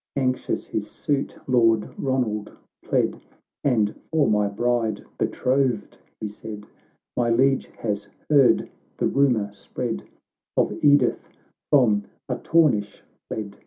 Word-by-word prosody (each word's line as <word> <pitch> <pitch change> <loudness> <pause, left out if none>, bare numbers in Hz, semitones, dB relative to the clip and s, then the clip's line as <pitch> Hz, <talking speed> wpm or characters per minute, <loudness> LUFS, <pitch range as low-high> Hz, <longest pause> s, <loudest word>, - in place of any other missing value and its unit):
Anxious 130 -2 -1
his - - -4
suit 140 -2 -2
Lord 115 -4 +4
Ronald 125 -6 -1 0.3
pled; - - 0 0.2
— - - -43
" - - -67
And 110 -6 +2 0.2
for 155 -3 +3
my 105 -1 +3
bride 115 +2 0 0.2
betrothed," 130 -1 0 0.2
he 110 - -3
said, 105 0 -8 0.3
" - - -46
My 120 -1 +1
Liege 135 +3 +3
has 105 -2 -3 0.2
heard 140 -4 +5 0.3
the - - 0
rumour 120 -7 +2
spread 100 - -4 0.6
Of - - +2
Edith 145 -4 +4 0.4
from 110 -8 +4 0.2
Artornish 125 -12 +1 0.2
fled. 100 -2 -6
120 Hz, 125 wpm, -24 LUFS, 105-135 Hz, 0.6 s, heard